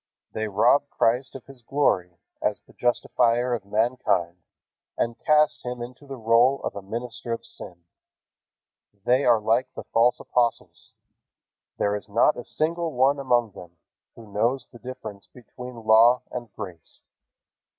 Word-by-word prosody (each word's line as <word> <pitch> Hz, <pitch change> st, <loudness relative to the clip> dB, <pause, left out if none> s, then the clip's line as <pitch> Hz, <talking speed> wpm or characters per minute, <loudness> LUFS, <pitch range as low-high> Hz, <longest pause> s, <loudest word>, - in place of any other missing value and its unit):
They 110 Hz, 0 st, -2 dB
rob 120 Hz, +8 st, +3 dB
Christ 125 Hz, +3 st, 0 dB
of 135 Hz, -, -9 dB
His 135 Hz, -3 st, -14 dB
glory 95 Hz, -10 st, 0 dB, 0.2 s
as -, -, -1 dB
the -, -, -21 dB
Justifier 120 Hz, 0 st, +1 dB
of 110 Hz, -5 st, -3 dB
mankind 105 Hz, -5 st, 0 dB, 0.6 s
and 115 Hz, 0 st, -1 dB
cast 150 Hz, -1 st, +3 dB
Him 125 Hz, 0 st, -5 dB
into 125 Hz, +4 st, -9 dB
the 135 Hz, -1 st, -7 dB
role 120 Hz, +4 st, +4 dB
of -, -, -3 dB
a 100 Hz, -, -5 dB
minister 115 Hz, +3 st, -6 dB
of 115 Hz, -, -6 dB
sin. 85 Hz, -1 st, -10 dB, 1.2 s
They 130 Hz, +3 st, +3 dB
are 120 Hz, -2 st, +5 dB
like 115 Hz, +4 st, +1 dB
the -, -, -6 dB
false 120 Hz, +2 st, +2 dB
apostles. 120 Hz, -2 st, -2 dB, 0.8 s
There 100 Hz, 0 st, +1 dB
is 105 Hz, +1 st, -7 dB
not 115 Hz, +8 st, +3 dB
a 120 Hz, -, -7 dB
single 165 Hz, +4 st, -1 dB
one 135 Hz, +3 st, +3 dB
among 120 Hz, -4 st, +1 dB
them 85 Hz, -2 st, -13 dB, 0.4 s
who 110 Hz, -3 st, -14 dB
knows 120 Hz, +4 st, 0 dB
the 120 Hz, -, -14 dB
difference 115 Hz, -6 st, -9 dB
between 125 Hz, +1 st, -11 dB
law 115 Hz, +3 st, +6 dB
and 120 Hz, -3 st, -6 dB
grace. 90 Hz, -6 st, -10 dB
120 Hz, 150 wpm, -25 LUFS, 110-130 Hz, 1.2 s, law